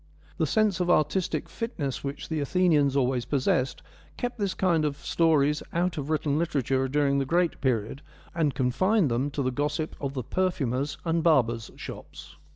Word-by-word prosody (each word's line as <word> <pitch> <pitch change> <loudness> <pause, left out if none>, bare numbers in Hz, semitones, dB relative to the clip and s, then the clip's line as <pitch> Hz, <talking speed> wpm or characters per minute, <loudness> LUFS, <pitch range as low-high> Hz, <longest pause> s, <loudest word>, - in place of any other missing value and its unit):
The - - +1
sense 215 -5 +2
of 175 -1 0
artistic 170 +3 +1
fitness 155 - -4
which 140 +1 -5
the 160 -1 -2
Athenians 150 -2 +2
always 130 -2 +1
possessed 130 -1 0 0.3
kept 245 -1 -4
this 200 -2 -1
kind 170 -4 +2
of 145 -2 -1
stories 150 -1 +2
out 175 +1 0
of 145 -1 -4
written 150 -1 0
literature 135 -5 0
during 140 0 +2
the - - +1
great 170 +3 +1
period, 130 0 -1 0.3
and 155 -5 0
confined 155 - +2
them 125 +5 0
to 140 0 -3
the 130 - 0
gossip 150 +4 -2
of 140 -1 -3
the 130 - -2
per 185 +9 +1
THE 175 -6 -3
MILESIAN 115 - -1
TALES 140 +3 -2
47 - - -23
furriers' - - -27
and 165 0 +1
barbers' 120 -8 +2
shops. - - -10
145 Hz, 190 wpm, -27 LUFS, 135-170 Hz, 0.3 s, sense